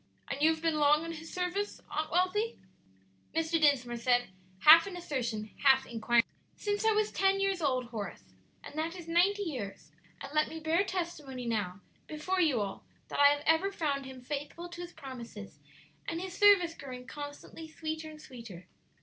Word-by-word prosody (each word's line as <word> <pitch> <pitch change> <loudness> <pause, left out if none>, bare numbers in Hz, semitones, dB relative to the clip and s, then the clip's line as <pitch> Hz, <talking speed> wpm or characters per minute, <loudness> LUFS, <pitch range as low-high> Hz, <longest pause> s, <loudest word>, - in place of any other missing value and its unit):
"And 275 - -3
you 310 - +6
have 320 0 -1
been 320 -2 +1
long 300 +2 +4
in 330 - -4
His 325 0 -8
service, 365 +3 -2
Aunt 310 0 -2
Wealthy?" 370 +7 +1 0.8
Mr. 325 0 +1
Dinsmore 250 -5 +3
said, 245 0 +2 0.3
half 330 +4 +9
in 370 -2 -6
assertion, 235 -10 -3
half 265 -1 +6
inquiringly. 235 0 +2 0.3
"Since 410 +1 -2
I 445 - +5
was 425 0 +1
ten 390 0 +2
years 390 -2 0
old, 255 -5 0
Horace; 205 - -6 0.4
and - - -10
that 330 +3 -2
is 345 -2 -9
ninety 375 +5 +3
years; 200 - -6 0.3
and 275 +1 -8
let 305 0 +2
me 320 - -6
bear 320 +4 +2
testimony 325 -9 -4
now, 200 -5 -2 0.3
before 365 +5 -1
you 285 -10 +3
all, 195 -1 -4 0.3
that - - -4
I 285 - +9
have 290 0 +2
ever 325 +5 +3
found 285 -7 -2
Him 260 -1 -10
faithful 295 +6 -5
to 345 0 -8
His 350 0 -7
promises, 240 - -9 0.5
and 330 - -2
His 370 0 -6
service 395 -5 +6
growing 250 -5 -9
constantly 290 +3 -8
sweeter 315 0 -5
and 310 -1 -11
sweeter. 230 - -10
310 Hz, 180 wpm, -31 LUFS, 255-345 Hz, 0.8 s, half